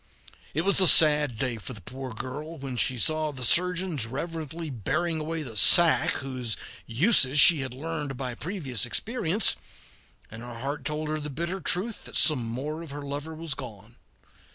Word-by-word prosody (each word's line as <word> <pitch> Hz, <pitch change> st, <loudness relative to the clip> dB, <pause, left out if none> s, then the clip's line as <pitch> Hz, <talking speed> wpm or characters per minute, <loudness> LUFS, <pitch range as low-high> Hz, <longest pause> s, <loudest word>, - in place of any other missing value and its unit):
It 160 Hz, -, +1 dB
was 195 Hz, +2 st, +5 dB
a 185 Hz, -, +7 dB
sad 150 Hz, -6 st, +7 dB
day 125 Hz, -1 st, -3 dB
for 110 Hz, +4 st, -8 dB
the 110 Hz, -, -11 dB
poor 130 Hz, 0 st, -8 dB
girl 145 Hz, +8 st, -8 dB
when, 135 Hz, -3 st, -7 dB
she 125 Hz, +1 st, 0 dB
saw 155 Hz, +4 st, +1 dB
the 130 Hz, -3 st, -7 dB
surgeons 180 Hz, -3 st, +2 dB
reverently 160 Hz, +3 st, -6 dB
bearing 160 Hz, -, -2 dB
away 160 Hz, +1 st, -4 dB
the 120 Hz, -6 st, -10 dB
sack 165 Hz, -, +5 dB, 0.2 s
whose 125 Hz, -4 st, -4 dB, 0.3 s
uses 140 Hz, -, +2 dB
she 160 Hz, +1 st, +8 dB
had 130 Hz, -2 st, -6 dB
learned 150 Hz, -2 st, -5 dB
by 125 Hz, -2 st, -5 dB
previous 145 Hz, -, -4 dB
experience, 210 Hz, -, -1 dB, 0.8 s
and 110 Hz, +1 st, -10 dB
her 120 Hz, -1 st, -9 dB
heart 140 Hz, +3 st, -5 dB
told 150 Hz, +1 st, -4 dB
her 155 Hz, 0 st, -3 dB
the 150 Hz, 0 st, -6 dB
bitter 170 Hz, +6 st, -5 dB
truth 200 Hz, +7 st, -3 dB
that -, -, -5 dB
some 150 Hz, -7 st, +3 dB
more 135 Hz, +8 st, -5 dB
of 165 Hz, -, -10 dB
her 145 Hz, +1 st, -8 dB
lover 145 Hz, +3 st, -6 dB
was 160 Hz, -2 st, -5 dB
gone. 115 Hz, -4 st, -11 dB
150 Hz, 175 wpm, -26 LUFS, 130-165 Hz, 0.8 s, she